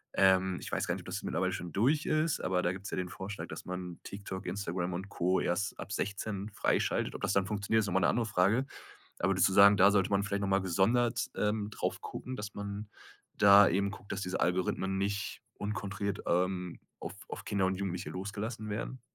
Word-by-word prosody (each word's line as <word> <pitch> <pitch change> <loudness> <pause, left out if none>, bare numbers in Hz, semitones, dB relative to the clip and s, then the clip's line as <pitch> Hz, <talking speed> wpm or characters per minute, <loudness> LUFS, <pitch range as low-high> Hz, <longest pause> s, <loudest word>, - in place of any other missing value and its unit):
ähm, 95 -1 +4
ich - - -7
weiß - - -1
gar - - 0
nicht, - - -7
ob - - -15
das - - -4
mittlerweile 95 +3 0
schon 90 -1 -5
durch 140 +9 +2
ist, 155 0 +1
aber 90 -1 +1
da 90 - +2
gibt's 95 +2 -7
ja - - -2
den 90 -1 -2
Vorschlag, 95 +3 -6
dass - - -7
man 90 -1 -5
TikTok, 100 -1 -7
Instagram 90 -2 -2
und 95 +3 -5
Co. 90 -1 +1
erst 95 +3 -1
ab - - -7
16 100 +1 -3
freischaltet. - - 0
Ob - - -7
das - - +1
dann 95 -1 +2
funktioniert, 105 +2 +1
ist 105 - -2
noch 95 - -2
mal 95 - +4
'ne - - +4
andere 120 -1 +1
Frage. 100 +6 +2 0.5
Aber 95 - +2
würdest 95 +1 +4
du - - -2
sagen, 100 +1 +8
da 95 +2 +7
sollte 100 -2 +2
man 100 0 +3
vielleicht 100 0 -2
noch 100 - 0
mal 95 0 +3
gesondert, 115 +6 +2
ähm, 105 0 0
drauf - - -2
gucken, 130 - -6
dass 105 -1 -5
man 100 +1 -5 0.5
da 100 0 +8
eben 100 +3 +1
guckt, 95 +1 -10
dass 100 - -3
diese 90 -1 -2
Algorithmen 95 +1 0
nicht 100 +1 -2
unkontrolliert, 100 -1 -3
ähm, 90 0 0 0.2
auf - - -6 0.2
auf - - -6
Kinder 100 -2 +1
und 95 0 +1
Jugendliche 95 -2 -3
losgelassen 105 +4 -5
werden? 115 +5 -4
100 Hz, 215 wpm, -31 LUFS, 95-105 Hz, 0.5 s, sagen